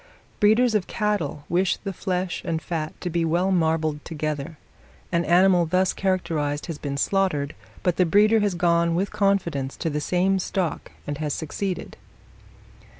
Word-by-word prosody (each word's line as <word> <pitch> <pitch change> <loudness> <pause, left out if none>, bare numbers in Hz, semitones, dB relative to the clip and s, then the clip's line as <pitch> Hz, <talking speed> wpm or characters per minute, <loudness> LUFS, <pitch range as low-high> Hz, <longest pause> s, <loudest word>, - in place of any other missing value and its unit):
Breeders 220 +3 +4
of 210 -4 +1
cattle 205 -10 -1
wish 180 +2 +1
the 195 -1 -5
flesh 180 0 -2
and 160 -1 -1
fat 160 -2 -4
to 180 - -2
be 170 0 +1
well 175 +4 +1
marbled 160 -3 +1
together. 155 0 -4 0.5
An 170 -1 +2
animal 175 +1 +4
thus 185 +3 +2
characterized 160 -6 -1
has 165 -3 -6
been 140 -1 -4
slaughtered, 155 -4 0 0.3
but 180 -2 +1
the 185 - +4
breeder 210 +5 +5
has 205 -3 0
gone 170 -1 +2
with 190 +3 -1
confidence 170 -10 0
to 165 - -2
the 150 +1 -2
same 185 +4 +1
stock 185 -3 -2
and 145 0 -4
has 150 -2 -1
succeeded. 180 +4 -4
175 Hz, 155 wpm, -24 LUFS, 155-190 Hz, 0.5 s, breeder